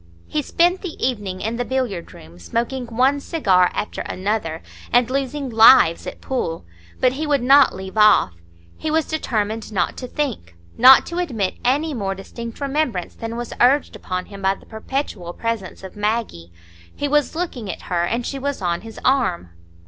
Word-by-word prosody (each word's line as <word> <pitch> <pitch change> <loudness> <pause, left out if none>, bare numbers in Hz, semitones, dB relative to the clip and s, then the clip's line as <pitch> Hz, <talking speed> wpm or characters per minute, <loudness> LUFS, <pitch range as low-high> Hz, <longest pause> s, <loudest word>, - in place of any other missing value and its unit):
He 300 - -2
spent 350 +6 +2
the 365 -5 -6
evening 205 -7 -2
in 225 +2 -2
the 245 - -1
billiard 245 -9 -3
room, 85 +2 -14
smoking 240 - -3
one 255 +5 +2
cigar 190 - +2
after 210 - -4
another, 185 -4 -3 0.3
and 245 -1 +4
losing 275 +1 -2
"lives" 225 -6 +6
at - - -7
pool. 165 - -3 0.3
But 255 - +4
he 305 +3 -3
would 285 -4 +1
not 275 +2 +6
leave 190 +1 -8
off. 210 - +5 0.4
He 315 - -3
was 315 0 +1
determined 220 -8 -2
not 195 - -1
to 250 - -6
think,—not 240 - +3
to 345 +1 -4
admit 230 - -2
any 290 +5 +1
more 195 -6 -2
distinct 230 +4 -8
remembrance 275 - -1
than 230 0 -6
was 240 -1 -5
urged 265 +4 +3
upon 185 0 -4
him 200 -1 -11
by 190 0 +2
the - - -19
perpetual 220 -6 -4
presence 230 -4 -4
of 190 - -9
Maggie. 210 - -2 0.4
He 290 - -2
was 295 +1 +1
looking 280 - -4
at - - -10
her, 175 -1 -1
and 235 +7 -1
she 275 - -4
was 280 +1 -3
on 175 -2 -1
his 225 0 -10
arm. 240 - +1
230 Hz, 175 wpm, -21 LUFS, 190-275 Hz, 0.4 s, lives